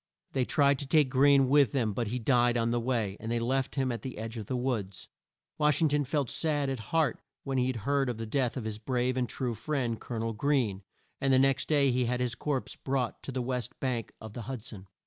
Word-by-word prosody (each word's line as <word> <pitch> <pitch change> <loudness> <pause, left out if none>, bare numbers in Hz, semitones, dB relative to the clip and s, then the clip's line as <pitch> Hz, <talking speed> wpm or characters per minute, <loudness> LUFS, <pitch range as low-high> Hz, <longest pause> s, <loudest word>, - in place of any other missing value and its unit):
They 130 -2 0
tried 140 0 +3
to 140 - -4
take 145 -2 +4
Greene 135 0 +5
with 140 -4 +4
them, 115 -6 +1
but 115 +2 -2
he 120 +4 -2
died 120 0 +3
on 115 0 +1
the 120 - +1
way, 115 -5 -1
and 115 +1 -5
they 120 - +1
left 130 +3 -1
him 135 -2 +1
at 115 -3 -4
the 130 +1 -6
edge 110 +2 -5
of 110 -4 -6
the 130 - -2
woods. 115 -7 -3 0.5
Wash 150 -2 +3
ing 160 -2 +3
ton 145 0 +1
felt 140 0 0
sad 145 0 0
at 135 - -3
heart 160 -3 +1 0.2
when 135 -2 -1
he 125 +1 +2
heard 135 +3 0
of 120 - -3
the 115 - -4
death 125 +2 0
of 125 - -3
his 110 -1 -4
brave 125 +2 0
and 125 -2 -1
true 125 -3 -2
friend, 120 -1 -2
Col 120 - -5
o - - -2
nel 115 0 -2
Greene, 115 -5 0 0.4
and 135 -1 +1
the 130 - +6
next 135 0 +2
day 140 -3 +4
he 125 0 +1
had 125 +1 0
his 125 -2 0
corpse 140 0 -3
brought 130 -3 -2
to - - -5
the 130 -1 -2
west 125 0 -3
bank 125 -4 -2
of 110 -1 -9
the 120 - -6
Hud 130 -5 -5
son. 100 -5 -8
125 Hz, 250 wpm, -30 LUFS, 115-135 Hz, 0.5 s, the